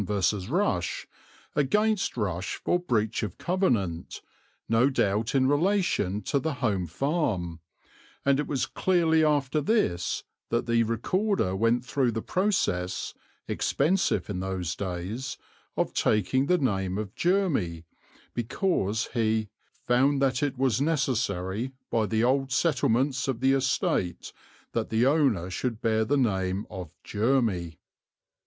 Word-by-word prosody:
_ 100 0 0
Rush) 175 - 0 0.5
against 210 +9 +1
Rush 95 -2 -2
for 175 - 0
breach 115 -10 0
of 105 -5 -4
covenant, 115 - -1 0.4
no 115 +4 +4
doubt 110 -2 0
in 130 -1 +4
relation 145 - +1
to 140 - 0
the 155 +2 -2
Home 100 -10 0
Farm, 95 - -1 0.7
and 140 0 +3
it 150 - -1
was 135 -4 0
clearly 165 -4 +2
after 150 -1 +2
this 145 - 0 0.3
that 120 - 0
the 115 -1 +2
Recorder 115 - 0
went 115 +4 +1
through 125 -2 +1
the 110 - -3
process, 90 - 0 0.3
expensive 180 +7 +1
in 100 -3 -3
those 95 -2 -3
days, 100 +7 -4 0.4
of - - 0
taking 120 +6 +2
the 180 - +4
name 95 - 0
of 105 -2 -4
Jermy 155 - 0 0.5
because 115 - 0
he 110 -2 +1 0.4
"found 135 +3 +3
that 130 -2 +1
it 145 -4 -1
was 130 -1 +1
necessary 125 - -1 0.2
by 110 -2 +1
the 110 +1 +1
old 135 +2 +2
settlements 130 -2 +1
of 130 -4 -1
the 135 +2 +3
estate 130 -9 0 0.4
that - - -2
the 115 +2 +2
owner 130 - +2
should 115 +3 -2
bear 110 -1 +1
the 145 +6 +1
name 95 -5 0
of 90 -5 -6
Jermy." 105 -8 0
120 Hz, 130 wpm, -27 LUFS, 100-140 Hz, 0.7 s, no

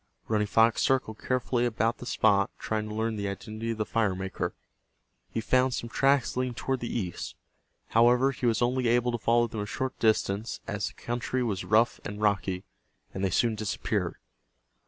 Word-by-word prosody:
Running 105 -1 +1
Fox 115 +2 +4
circled 125 -5 +1
carefully 125 -1 0
about 115 -1 0
the 125 - -8
spot, 100 -5 +3
trying 110 -1 -2
to 105 - -5
learn 110 0 -1
the 100 -1 -2
identity 110 +3 -5
of 115 - -2
the 110 - -1
firemaker. 95 -4 -1 0.7
He - - -3
found 130 +2 +2
some 115 - -4
tracks 135 -2 +2
leading 125 -1 -1
toward 130 +2 -1
the 120 - -4
east. 90 -8 -4 0.5
However, 120 +4 +5
he 125 -2 -2
was 115 0 +2
only 125 0 +1
able 120 +1 +3
to 120 - -2
follow 120 +1 +3
them 110 -2 -4
a 105 - -4
short 130 +4 -3
distance, 110 -1 +1
as 105 -2 -2
the - - -8
country 120 +2 -2
was 100 -6 -2
rough 110 +3 +3
and 105 0 -6
rocky, 100 -3 0 0.5
and 95 - -4
they 95 - +2
soon 115 +5 +2
disappeared. 110 -2 -2
115 Hz, 180 wpm, -28 LUFS, 105-120 Hz, 0.7 s, However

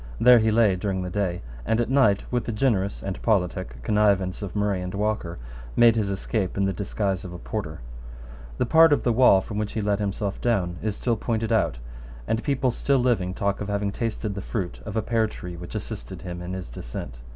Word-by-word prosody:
There 125 0 +8
he 110 0 +2
lay 110 -3 +4
during 95 0 -2
the 90 - -5
day, 90 -5 -1 0.2
and 110 - +1
at 120 - +1
night, 110 -8 +4
with 120 -2 0
the - - -2
generous 105 -4 0
and 95 -1 -4
politic 90 - 0
connivance 100 0 +2
of 100 -2 -6
Murray 100 -2 0
and 90 0 -4
Walker, 100 -4 -1 0.4
made 120 -1 +6
his 105 -3 0
escape 100 0 -2
in 100 - +2
the 95 - 0
disguise 100 -1 -2
of 90 -2 -7
a - - -6
porter, 85 - -5 0.8
The - - +1
part 160 +4 +6
of - - +1
the 120 - +2
wall 110 -5 +6
from 105 +2 -5
which 105 -1 -3
he 115 - -2
let 100 0 +1
himself 100 -1 -2
down 95 -8 0
is 105 -1 -1
still 115 0 0
pointed 115 0 -1
out; - - +2 0.5
and 115 +1 0
people 135 -2 +1
still 140 +3 +1
living 115 -8 +1
talk 100 0 -1
of 100 - -3
having 100 0 -1
tasted 110 -1 -3
the 100 - -5
fruit 95 -3 -4
of 105 - -3
a 110 - +1
pear 115 -2 +1
tree 90 -4 -8
which 90 +4 -9
assisted 100 -5 -6
him 90 -1 -6
in 90 +1 -5
his 95 -8 -6
descent. - - -7
100 Hz, 220 wpm, -25 LUFS, 95-115 Hz, 0.8 s, There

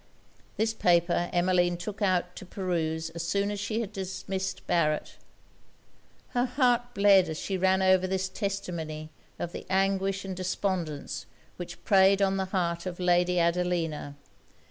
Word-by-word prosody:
This 225 +1 +1
paper 175 -3 +2
Emmeline 175 0 +2
took 200 +3 -6
out 180 -2 +1
to - - -7
peruse 165 -4 -2
as 170 0 -5
soon 200 +4 0
as 205 - -4
she 215 +3 -1
had 210 -2 -6
dismissed 190 0 -4
Barret. 155 -3 0 1.1
Her 245 0 +1
heart 245 -2 +1
bled 200 -3 +5
as 160 - -4
she 195 - -3
ran 190 +1 +2
over 185 0 +4
this 190 0 -1
testimony 170 -6 -4 0.3
of 175 - -4
the - - -8
anguish 195 +1 +1
and 190 -1 -4
despondence 185 -5 -3 0.3
which 175 -1 -8
preyed 195 0 +5
on 195 -1 +2
the 190 - 0
heart 175 -2 -1
of 180 0 -6
Lady 180 0 +3
Adelina. 170 -4 0
185 Hz, 145 wpm, -28 LUFS, 175-195 Hz, 1.1 s, bled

